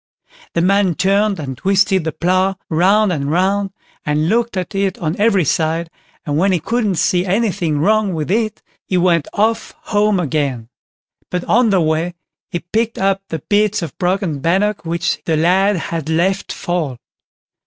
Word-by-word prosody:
The 170 Hz, -, +1 dB
man 195 Hz, -2 st, +2 dB
turned 200 Hz, +1 st, +1 dB
and 135 Hz, -3 st, -5 dB
twisted 190 Hz, +1 st, +2 dB
the 160 Hz, -, -1 dB
plough 185 Hz, +4 st, +1 dB
round 190 Hz, +5 st, +3 dB
and 140 Hz, -3 st, -2 dB
round, 195 Hz, +4 st, +1 dB, 0.3 s
and 150 Hz, +2 st, 0 dB
looked 230 Hz, -1 st, 0 dB
at 185 Hz, +2 st, -3 dB
it 195 Hz, -1 st, -1 dB
on 165 Hz, -1 st, -2 dB
every 200 Hz, -5 st, +3 dB
side, 165 Hz, +3 st, 0 dB, 0.3 s
and 145 Hz, 0 st, 0 dB
when 195 Hz, +3 st, +3 dB
he 180 Hz, -, +1 dB
couldn't 220 Hz, 0 st, -1 dB
see 175 Hz, +2 st, +1 dB
anything 185 Hz, -5 st, 0 dB
wrong 205 Hz, +3 st, +2 dB
with 155 Hz, +2 st, -3 dB
it 220 Hz, 0 st, -1 dB, 0.2 s
he 185 Hz, -, 0 dB
went 170 Hz, -3 st, +2 dB
off 220 Hz, +2 st, 0 dB, 0.2 s
home 205 Hz, -1 st, +3 dB
again; 140 Hz, -7 st, -2 dB, 0.6 s
but 180 Hz, -1 st, -2 dB
on 240 Hz, 0 st, +3 dB
the 190 Hz, -3 st, +3 dB
way 160 Hz, +2 st, 0 dB, 0.3 s
he 175 Hz, -, -3 dB
picked 225 Hz, +6 st, -2 dB
up 195 Hz, 0 st, +1 dB
the 160 Hz, -3 st, -5 dB
bits 210 Hz, -2 st, +2 dB
of 160 Hz, -, -6 dB
broken 180 Hz, -4 st, 0 dB
bannock 195 Hz, +7 st, 0 dB
which 170 Hz, 0 st, -2 dB
the 160 Hz, -2 st, +1 dB
lad 190 Hz, +5 st, +3 dB
had 165 Hz, -2 st, -4 dB
let 180 Hz, +4 st, 0 dB
fall. 165 Hz, -8 st, -3 dB
185 Hz, 165 wpm, -18 LUFS, 165-200 Hz, 0.6 s, round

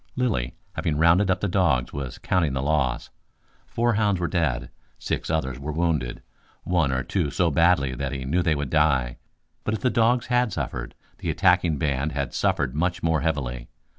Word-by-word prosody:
Lilly, 110 Hz, -, -1 dB, 0.2 s
having 75 Hz, -2 st, -1 dB
rounded 85 Hz, +5 st, +4 dB
up 95 Hz, -1 st, +1 dB
the 105 Hz, -, +1 dB
dogs, 85 Hz, -10 st, +1 dB
was 70 Hz, -3 st, -5 dB
counting 80 Hz, -7 st, 0 dB
the 65 Hz, 0 st, -2 dB
loss. 70 Hz, -5 st, 0 dB, 0.6 s
Four 120 Hz, 0 st, +1 dB
hounds 105 Hz, -3 st, +1 dB
were 85 Hz, -, 0 dB
dead. 80 Hz, -10 st, -1 dB, 0.3 s
Six -, -, -3 dB
others 65 Hz, -5 st, -1 dB
were 75 Hz, +3 st, -4 dB
wounded, 75 Hz, -6 st, -1 dB, 0.4 s
one 85 Hz, -6 st, +1 dB
or 65 Hz, -1 st, -1 dB
two 85 Hz, 0 st, -1 dB
so 85 Hz, +5 st, +1 dB
badly 75 Hz, -4 st, +3 dB
that 65 Hz, +1 st, -3 dB
he 65 Hz, -1 st, -4 dB
knew 85 Hz, +7 st, +1 dB
they 80 Hz, -3 st, +2 dB
would 70 Hz, -2 st, -4 dB
die. 70 Hz, -6 st, +2 dB, 0.5 s
But 110 Hz, -, -1 dB
if -, -, -6 dB
the 125 Hz, -, +2 dB
dogs 120 Hz, +2 st, +2 dB
had 125 Hz, -2 st, +1 dB
suffered, -, -, -4 dB, 0.2 s
the -, -, -3 dB
attacking 90 Hz, -3 st, +3 dB
band 70 Hz, +1 st, -1 dB
had 70 Hz, -3 st, -3 dB
suffered 65 Hz, -2 st, 0 dB
much 85 Hz, +4 st, -1 dB
more 80 Hz, -3 st, +2 dB
heavily. 65 Hz, -6 st, -2 dB
80 Hz, 185 wpm, -25 LUFS, 65-90 Hz, 0.6 s, rounded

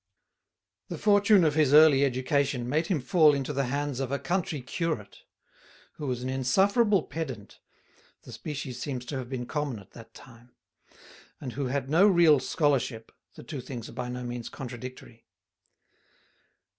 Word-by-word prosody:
The 170 Hz, -, -6 dB
fortune 205 Hz, 0 st, +4 dB
of 155 Hz, -2 st, +2 dB
his 150 Hz, -2 st, +3 dB
early 150 Hz, -3 st, +7 dB
education 135 Hz, -1 st, 0 dB
made 155 Hz, +5 st, 0 dB
him 180 Hz, -6 st, 0 dB
fall 150 Hz, +3 st, +4 dB
into 140 Hz, +1 st, -3 dB
the 140 Hz, 0 st, 0 dB
hands 140 Hz, +1 st, -2 dB
of 135 Hz, -1 st, -3 dB
a 140 Hz, -, 0 dB
country 175 Hz, -2 st, -2 dB
curate, 130 Hz, -, -4 dB, 0.8 s
who 150 Hz, -, -5 dB
was 125 Hz, -1 st, -3 dB
an 130 Hz, -, -3 dB
insufferable 190 Hz, -, +2 dB
pedant 135 Hz, -11 st, -7 dB, 0.6 s
(the -, -, -12 dB
species 135 Hz, -5 st, -6 dB
seems 130 Hz, -3 st, -4 dB
to 135 Hz, +1 st, -4 dB
have 125 Hz, -2 st, -7 dB
been 125 Hz, -2 st, -4 dB
common 145 Hz, -3 st, -3 dB
at 100 Hz, -1 st, -15 dB
that 115 Hz, -1 st, -14 dB
time), 120 Hz, 0 st, -16 dB, 0.8 s
and 125 Hz, -4 st, -6 dB
who 140 Hz, -1 st, -3 dB
had 135 Hz, +1 st, -2 dB
no 170 Hz, +8 st, +5 dB
real 170 Hz, -7 st, +5 dB
scholarship 135 Hz, -6 st, -1 dB, 0.2 s
(the -, -, -11 dB
two 135 Hz, +2 st, -6 dB
things 120 Hz, -3 st, -8 dB
are -, -, -12 dB
by 125 Hz, 0 st, -5 dB
no 125 Hz, 0 st, -5 dB
means 120 Hz, -1 st, -5 dB
contradictory). 125 Hz, -2 st, -9 dB
135 Hz, 160 wpm, -27 LUFS, 125-155 Hz, 0.8 s, early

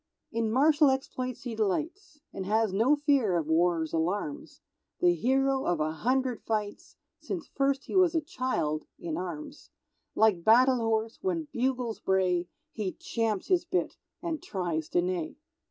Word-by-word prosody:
In 230 Hz, -1 st, -1 dB
martial 295 Hz, +4 st, +5 dB
exploits 255 Hz, -2 st, -3 dB
he 245 Hz, -2 st, -4 dB
delights, 300 Hz, -, -2 dB
And 190 Hz, -1 st, -5 dB
has 215 Hz, -1 st, +2 dB
no 235 Hz, +9 st, +4 dB
fear 280 Hz, -, +2 dB
of 165 Hz, -, -1 dB
War's 160 Hz, 0 st, +1 dB
alarms; 205 Hz, -, -2 dB, 0.4 s
The 350 Hz, 0 st, +4 dB
hero 270 Hz, -1 st, +1 dB
of 175 Hz, -2 st, +1 dB
a 155 Hz, 0 st, 0 dB
hundred 255 Hz, +8 st, 0 dB
fights, 210 Hz, -2 st, -4 dB, 0.2 s
Since 345 Hz, -, -5 dB
first 275 Hz, 0 st, 0 dB
he -, -, -6 dB
was 365 Hz, -3 st, +4 dB
a 325 Hz, -, +3 dB
child 250 Hz, -, -2 dB
(in 165 Hz, -2 st, -4 dB
arms); 170 Hz, -3 st, -6 dB, 0.5 s
Like 210 Hz, -6 st, +3 dB
battle 250 Hz, +5 st, +6 dB
horse, 225 Hz, 0 st, -1 dB
when 335 Hz, -5 st, -2 dB
bugles 250 Hz, -3 st, -1 dB
bray, 180 Hz, -2 st, +1 dB, 0.2 s
He 205 Hz, -4 st, -3 dB
champs 225 Hz, -4 st, -2 dB
his 365 Hz, -2 st, +3 dB
bit 365 Hz, +1 st, -1 dB, 0.3 s
and 325 Hz, -3 st, -3 dB
tries 170 Hz, -5 st, -3 dB
to 175 Hz, -, +2 dB
neigh. 180 Hz, -3 st, -2 dB
230 Hz, 155 wpm, -29 LUFS, 185-280 Hz, 0.5 s, battle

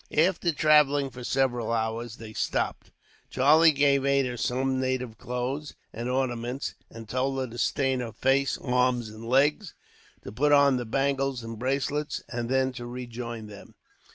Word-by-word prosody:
After 170 Hz, +1 st, +3 dB
travelling 145 Hz, -2 st, +3 dB
for 125 Hz, +1 st, -9 dB
several 120 Hz, -3 st, 0 dB
hours, 115 Hz, 0 st, -2 dB
they 110 Hz, -2 st, -10 dB
stopped. -, -, -2 dB, 0.4 s
Charlie 155 Hz, +5 st, +5 dB
gave 140 Hz, -1 st, +3 dB
Ada 135 Hz, -3 st, +1 dB
some 130 Hz, +1 st, 0 dB
native 130 Hz, -3 st, -2 dB
clothes 130 Hz, +4 st, -4 dB, 0.2 s
and 120 Hz, +2 st, -4 dB
ornaments, 125 Hz, 0 st, -2 dB, 0.2 s
and 115 Hz, -1 st, -10 dB
told 130 Hz, +3 st, -1 dB
her 130 Hz, -, -1 dB
to 120 Hz, -1 st, -9 dB
stain 135 Hz, -2 st, +1 dB
her 120 Hz, -2 st, -4 dB
face, 135 Hz, +3 st, +1 dB
arms, 125 Hz, -2 st, 0 dB
and 110 Hz, +1 st, -11 dB
legs, 145 Hz, -, +1 dB, 0.5 s
to -, -, -8 dB
put 145 Hz, +7 st, +2 dB
on 140 Hz, -2 st, +5 dB
the 120 Hz, -, -3 dB
bangles 135 Hz, +1 st, -1 dB
and 115 Hz, -1 st, -7 dB
bracelets, 140 Hz, +3 st, -2 dB
and 120 Hz, -1 st, -4 dB
then 130 Hz, 0 st, +2 dB
to 120 Hz, -1 st, -7 dB
rejoin 120 Hz, -2 st, -6 dB
them. 105 Hz, -1 st, -13 dB
130 Hz, 155 wpm, -27 LUFS, 120-140 Hz, 0.5 s, Charlie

